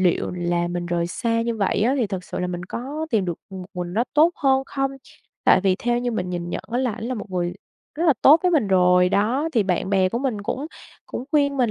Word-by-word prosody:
liệu 180 -2 +1
là 175 -1 -1
mình 175 0 -3
rời 170 -1 0
xa 230 +5 -1
như 230 -1 -2
vậy 200 0 +1
á 250 +5 +3
thì 235 - +1
thật 190 -2 -5
sự - - -6
là 180 - -1
mình 175 0 -4
có 285 - -5
tìm 210 -4 +2
được 175 -2 -3
một 185 -2 -7
mình 175 -1 -4
nó 230 - +2
tốt 315 +3 +6
hơn 270 -1 +2
không? 270 -1 -1 0.5
Tại - - +6
vì 190 -1 +2
theo 240 +3 0
như 245 0 -1
mình 180 -5 -3
nhìn 175 -1 -4
nhận - - -4
á 245 - +1
là 255 -4 0
ảnh 220 - -7
là 255 +1 -2
một 210 -3 -7
người 175 -1 -2 0.4
rất 330 +3 -1
là 305 - +7
tốt 305 +4 +8
với 360 - +3
mình 280 - +2
rồi, 180 -1 +4
đó, 240 - +1
thì 225 -5 +3
bạn 190 0 -1
bè 190 -2 +3
của 235 - -2
mình 250 -6 -2
cũng 260 +7 -3 0.4
cũng 250 - -5
khuyên 285 -2 +2
mình 245 -4 +2
210 Hz, 260 wpm, -23 LUFS, 180-260 Hz, 0.5 s, tốt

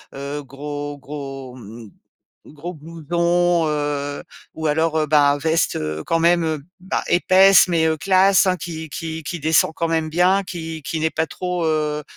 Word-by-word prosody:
heu, 140 +2 -5
gros 145 +1 -6
gros, 135 -2 -8
mmh, 115 -2 -12 0.6
gros 160 +4 -8
blouson, 170 +2 0
heu, 145 -1 -2 0.3
ou 160 - -4
alors, 160 +1 +1
heu, 155 - 0
bah, 145 -1 +3
veste, 160 +2 +1
heu, 75 0 -4
quand 165 - 0
même, 170 0 +3
heu, 160 -2 -2 0.2
bah 185 - -2
épaisse 190 +2 +6
mais, 165 -2 +2
heu, 160 0 +1
classe, 190 +2 +4
hein, 185 -1 +2
qui 160 -2 -7
qui 160 +1 -5
qui 170 +3 -5
descend 160 +1 +3
quand 165 0 -2
même 160 -1 -1
bien 180 +4 +3
qui 165 -3 -6
qui 160 +3 -4
n'est 160 0 +1
pas 160 +1 -1
trop, 180 0 -3
heu 150 -1 0
160 Hz, 175 wpm, -21 LUFS, 145-170 Hz, 0.6 s, épaisse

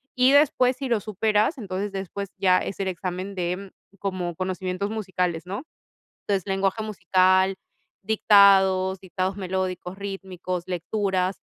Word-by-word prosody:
y 255 +1 +5
después 260 -3 +4
si 270 -1 -4
lo 225 -3 +1
superas, 215 - +1
entonces 200 -2 -4
después 195 0 -5
ya 185 -1 +4
es 200 - -5
el 195 - -1
examen 185 +2 -4
de 180 +2 -3 0.3
como 185 -3 -3
conocimientos 185 +2 -3
musicales, 185 -6 -2
¿no? 200 +9 -5 0.7
Entonces 195 -3 +1
lenguaje 195 +2 0
musical, 190 -1 +3 0.5
dictados, 195 -3 +5
dictados 185 +1 -3
melódicos, 185 -1 -3
rítmicos, 185 -3 -5
lecturas, 185 +1 -1
190 Hz, 125 wpm, -25 LUFS, 185-200 Hz, 0.7 s, y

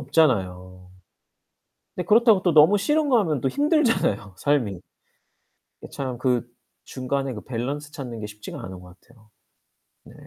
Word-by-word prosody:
없잖아요. 95 - 0 1.1
근데 180 - -4
그렇다고 220 -2 +5
또 175 -4 +2
너무 160 +7 +6
싫은 295 +8 +1
거 245 -4 +5
하면 155 - -1
또 135 - 0
힘들잖아요 245 - +1
삶이. 140 -7 +1 1.1
이게 - - -10
참 130 -3 -4
그 125 -2 0 0.4
중간에 135 0 -3
그 105 - -8
밸런스 140 +5 -5
찾는 125 -6 -7
게 105 - -5
쉽지가 105 0 -9
않은 95 -1 -8
거 90 - -14
같아요. 105 +3 -24 0.8
네. - - -15
135 Hz, 290 characters per minute, -24 LUFS, 105-175 Hz, 1.1 s, 너무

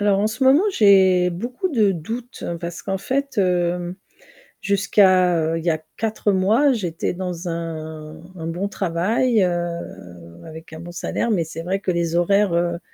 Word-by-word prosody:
Alors 205 -1 +2
en 210 - +2
ce 220 +5 -3
moment 270 +7 +6
j'ai 190 - +5
beaucoup 240 - -3
de 215 - +2
doutes 230 +9 -7 0.2
parce 170 0 -6
qu'en 195 - -2
fait, 275 +5 -3
hem, 180 -2 0 0.7
jusqu'à, 190 -3 +3
heu, 160 +1 -1
il 165 - -8
y 170 - +3
a 155 - +1 0.2
4 220 -1 -1
mois 215 +9 +3
j'étais 180 -9 -3
dans 180 -1 -5
un 160 -2 -6 0.2
un 165 -2 -6
bon 175 +4 -2
travail, 205 +5 +1
heu, 170 - -5
avec 160 0 -11
un 160 - -8
bon 170 +1 -9
salaire, 175 +6 -2
mais 195 -7 +1
c'est 160 +1 -7
vrai 185 +3 -2
que 190 - -1
les 170 -1 -1
horaires, 195 +2 +2
heu, 170 0 0
180 Hz, 170 wpm, -21 LUFS, 170-205 Hz, 0.7 s, moment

